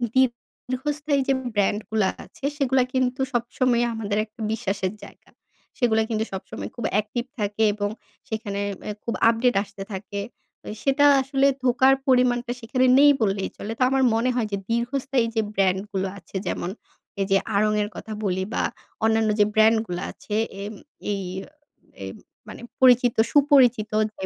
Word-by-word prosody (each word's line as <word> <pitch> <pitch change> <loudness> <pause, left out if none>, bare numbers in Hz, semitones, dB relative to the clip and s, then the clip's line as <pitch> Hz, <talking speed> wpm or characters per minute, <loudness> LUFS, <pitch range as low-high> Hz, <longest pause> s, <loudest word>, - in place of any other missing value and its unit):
দীর্ঘস্থায়ী 265 +3 -1
যে 270 - +4 0.2
ব্র্যান্ডগুলা 205 0 +1 0.2
আছে - - -10
সেগুলা 265 -2 +2
কিন্তু 255 0 0
সবসময় 240 0 +1
আমাদের 210 -2 -2
একটা 225 +2 -36
বিশ্বাসের 200 -3 -2
জায়গা। - - -14 0.5
সেগুলা 225 -4 +2
কিন্তু 220 -1 0
সবসময় 190 - -6
খুব 235 - -4
অ্যাক্টিভ 215 +3 0 0.2
থাকে 210 +1 0
এবং 205 0 -2 0.4
সেখানে 210 -2 -3 0.3
আ - - -3
খুব 235 - -2 0.2
আপডেট 230 +1 +2
আসতে 200 -1 -9
থাকে। 200 +1 -5 0.5
এ - - -4
সেটা 280 +1 +3 0.2
আসলে 270 +1 +2 0.2
ধোকার 260 +2 +5
পরিমাণটা 250 -1 +3
সেখানে 255 +3 +1
নেই 290 0 +8
বললেই 195 -2 0
চলে। 210 - -5
তো - - +4
আমার 270 0 +2
মনে 235 +3 +1
হয় 235 -3 0
যে 200 - 0
দীর্ঘস্থায়ী 250 +2 0
যে 220 - +3
ব্র্যান্ডগুলো 195 0 0
আছে 190 - -16
যেমন, 175 - -2 0.5
এই - - +2
যে 195 - +6 0.2
Aarong 215 +1 +3
এর 205 - -4
কথা 220 - -8
বলি 190 -2 0
বা - - 0 0.4
অন্যান্য 220 0 +3
যে 205 - +6
ব্র্যান্ডগুলা 220 -4 +3
আছে 210 - -6 0.3
এ - - -4 0.5
এই 200 - -2 0.8
এই - - -5 0.4
মানে - - -9 0.2
পরিচিত 250 -2 +5 0.2
সুপরিচিত 265 -7 +4 0.3
যে 190 - -3
230 Hz, 150 wpm, -24 LUFS, 205-255 Hz, 0.8 s, নেই